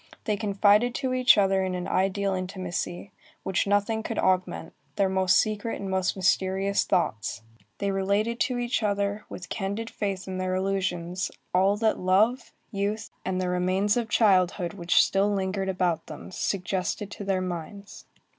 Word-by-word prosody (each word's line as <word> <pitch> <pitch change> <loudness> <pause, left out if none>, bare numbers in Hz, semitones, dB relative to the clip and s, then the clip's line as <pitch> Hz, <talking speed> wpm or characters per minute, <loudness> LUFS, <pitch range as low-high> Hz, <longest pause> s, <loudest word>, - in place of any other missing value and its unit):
They 215 -4 0
confided 210 +3 +3
to 260 -2 -1
each 255 -2 +5
other 195 -1 +3
in 185 -1 -2
an 180 0 -4
ideal 195 +1 +1
intimacy, 185 0 -4 0.3
which 190 +1 0
nothing 205 +2 +1
could 225 +1 -5
augment, 185 -3 0 0.2
their 195 -1 +2
most 190 -1 +3
secret 215 +1 0
and 195 -1 -4
most 190 -1 0
mysterious 190 +1 +1
thoughts. 110 - -1 0.3
They 200 0 -1
related 200 +4 0
to 255 -3 0
each 240 0 -1
other, 205 0 -1
with 180 - -8
candid 205 +3 -3
faith 195 -3 -3
in 185 0 -4
their 185 0 -1
illusions, 185 -2 -1 0.2
all 190 +3 +3
that 220 0 +1
love, 215 +7 +2 0.2
youth, 205 +2 -2
and 185 -1 -2
the 185 - -1
remains 185 +3 +1
of 235 -2 -1
childhood 185 -5 +3
which 175 -3 +3
still 195 +2 +1
lingered 195 0 -1
about 180 -3 0
them, - - -9
suggested 190 +1 -2
to 205 - -7
their 195 -1 0
minds. 185 +3 -7
195 Hz, 160 wpm, -26 LUFS, 185-205 Hz, 0.3 s, each